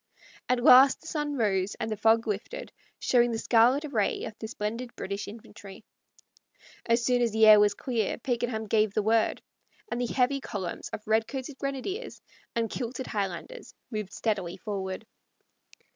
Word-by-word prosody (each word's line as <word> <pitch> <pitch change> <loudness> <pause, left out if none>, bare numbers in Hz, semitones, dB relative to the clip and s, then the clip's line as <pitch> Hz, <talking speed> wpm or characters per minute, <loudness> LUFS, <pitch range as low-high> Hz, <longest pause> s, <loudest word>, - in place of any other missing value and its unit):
At 250 -1 +1
last 265 +2 +8
the - - -19
sun 295 -2 -2
rose 195 -4 0
and 220 - -4
the - - 0
fog 225 +2 +3
lifted, 220 - -4 0.3
showing 240 -1 +3
the 230 - -2
scarlet 245 +6 +3
array 225 -9 -1
of 220 - -5
the 220 - -5
splendid 230 +2 -5
British 200 +1 -5
infantry. 210 -1 -12 1.0
As 230 0 +2
soon 250 -1 +2
as 235 -2 +2
the 220 0 +5
air 215 -1 +9
was 205 -1 +3
clear 230 -4 -2
Pakenham 235 -2 -2
gave 215 -1 +1
the 215 - +1
word, 220 +1 +1 0.5
and 240 - -1
the 245 - -2
heavy 270 +2 +1
columns 190 -8 -5
of 215 - -7
redcoated 255 +5 -1
grenadiers 275 - -4 0.4
and 230 -1 +1
kilted 250 +2 -4
Highlanders 205 - -5 0.2
moved 215 -3 -4
steadily 195 -6 -2
forward. 195 -1 -5
225 Hz, 160 wpm, -28 LUFS, 210-250 Hz, 1.0 s, air